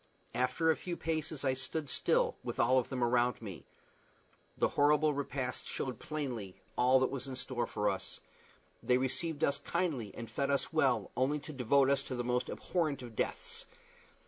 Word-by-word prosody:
After 130 +7 +2
a - - +2
few 175 -2 -5
paces 155 -3 -2
I 130 - +3
stood 140 +4 -3
still, - - +2
with - - -4
all 130 +2 +5
of 125 - -3
them 130 -2 -1
around 120 +1 +2
me. 100 -6 -8 0.9
The - - +3
horrible 150 +1 +4
repast 140 -2 -3
showed 130 - -3
plainly 125 -11 -4 0.2
all 130 +1 +5
that 130 - +2
was 135 0 -4
in 130 - -5
store 130 -1 -2
for 105 - -1
us. - - -2 0.6
They 125 - +3
received 155 +4 -1
us 140 - +2
kindly 135 - -1
and 115 - -6
fed 140 +4 -1
us 140 +3 0
well 130 -10 +2
only 135 +4 +2
to 155 +1 -8
devote 135 +1 +4
us 140 - +3
to 130 - -4
the 120 - -1
most 125 +1 0
abhorrent 155 -7 -1
of 120 -2 -9
deaths. 470 - -3
130 Hz, 180 wpm, -33 LUFS, 125-150 Hz, 0.9 s, all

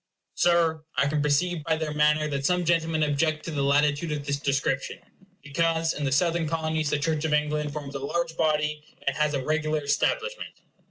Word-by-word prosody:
Sir, 165 -2 +2
I 130 - +3
can 150 +1 0
perceive 155 +3 +1
by 160 +1 +1
their 155 -1 -3
manner 150 +1 +3
that 140 -1 -2
some 180 +4 +1
gentlemen 165 -2 +1
object 155 +1 0
to 165 - -4
the 145 -2 -2
latitude 145 +3 +2
of 145 -2 -3
this 140 0 -1
description, 135 -1 -1 0.5
because 165 +2 0
in 145 - -3
the 135 - 0
Southern 165 +3 +2
Colonies 160 -1 -1
the 150 - +1
Church 155 +1 -1
of 160 -1 0
England 150 0 0
forms 145 -2 -6
a 140 - -4
large 165 +4 -2
body, 150 -1 0 0.2
and - - 0
has 150 -1 +1
a 130 -2 -3
regular 155 0 0
establishment. 470 - -1
150 Hz, 195 wpm, -26 LUFS, 145-160 Hz, 0.5 s, I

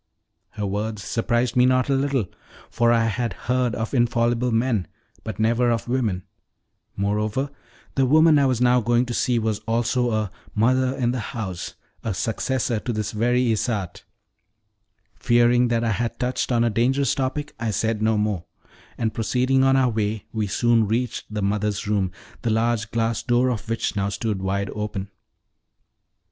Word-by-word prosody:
Her 105 - -3
words 105 +1 -3
surprised 120 +1 0
me 125 0 +5
not 130 0 +2
a 140 - +2
little, 135 -4 +1 0.5
for 120 0 +3
I 115 -1 +3
had 115 +2 -1
heard 125 -2 -1
of 110 +3 -4
infallible 120 0 +2
men, 115 -5 +1 0.4
but 110 -2 -6
never 120 +2 +2
of 115 0 -1
women; 115 -8 -1 0.7
moreover, 105 +7 -1 0.4
the 135 -1 +2
woman 155 +2 +6
I 140 - +3
was 130 -3 0
now 125 0 +4
going 120 +2 +2
to 120 - -4
see 120 0 +1
was 110 -2 0
also 120 +2 +1
a 110 -4 -1 0.2
"mother 130 +4 +2
in 120 -3 +1
the 125 - -2
house," 95 -4 -5 0.3
a 110 -4 -2
successor 115 +3 -1
to 120 - -3
this 110 -2 -2
very 120 +3 +1
Isarte. 105 -5 -2 1.2
Fearing 120 +1 +4
that 120 -1 0
I 115 - +1
had 115 +3 -2
touched 125 +1 -1
on 120 -1 +3
a 120 - +2
dangerous 130 +5 +2
topic, 140 +2 -2
I 115 -1 -1
said 110 +2 -1
no 110 0 +2
more, 105 -5 -1 0.5
and 110 -2 -1
proceeding 130 +4 +1
on 135 0 +4
our 130 -2 +3
way, 110 -1 -2
we 110 -2 -1
soon 115 +1 +2
reached 115 +1 -2
the 105 -1 -2
mother's 105 0 -1
room, 100 -3 +1 0.3
the 120 - -1
large 110 0 +1
glass 115 0 0
door 120 +1 +2
of 115 -1 -5
which 115 -1 -1
now 100 0 0
stood 100 -1 -2
wide 100 +1 -1
open. 105 -2 -4
115 Hz, 170 wpm, -23 LUFS, 105-125 Hz, 1.2 s, woman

